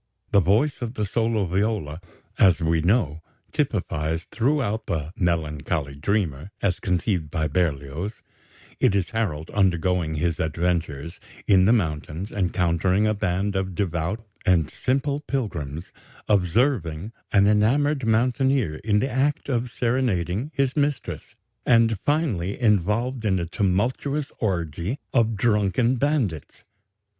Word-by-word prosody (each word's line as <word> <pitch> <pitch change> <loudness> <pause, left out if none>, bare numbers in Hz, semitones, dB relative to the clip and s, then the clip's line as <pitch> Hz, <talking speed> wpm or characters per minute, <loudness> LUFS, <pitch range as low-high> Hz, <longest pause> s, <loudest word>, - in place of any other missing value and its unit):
The 100 - +5
voice 105 - +2
of 120 0 -4
the 105 - -1
solo 110 0 0
viola, 95 -4 -1 0.4
as 90 -3 +5
we 80 -1 +1
know, 85 -4 +1 0.3
typifies 80 +2 -1
throughout 120 -3 0
the 80 0 -3
"melancholy 75 -4 -1
dreamer" 80 0 -1
as 90 -3 0
conceived 90 -3 -1
by 80 -1 -1
Berlioz 80 +4 -2 0.6
it 100 - +3
is 95 -3 0
Harold 90 -9 -2
undergoing 90 -4 +1
his 85 +1 -1
adventures: 80 -1 -2 0.3
in 95 -2 +5
the 110 - +5
mountains; 85 -2 -1
encountering 90 +1 +1
a 110 - +2
band 100 0 -1
of 95 -1 -2
devout 90 +3 -2 0.2
and 85 -4 +2
simple 140 +2 0
pilgrims; 85 - -4 0.4
observing 100 - +1 0.2
an 100 -2 +5
enamoured 130 +8 +3
mountaineer 120 - +2
in 105 +3 +1
the 135 - -1
act 140 +3 0
of 125 -1 0
serenading 115 - 0
his 135 -1 +1
mistress; 145 -1 -2 0.3
and, 115 -3 +3
finally, 115 - 0
involved 110 +3 +1
in 100 -3 +2
a 85 - -1
tumultuous 115 - -1
orgy 85 - -2 0.2
of 115 -3 +3
drunken 105 +3 +2
bandits. 120 - -1
100 Hz, 125 wpm, -24 LUFS, 85-115 Hz, 0.6 s, The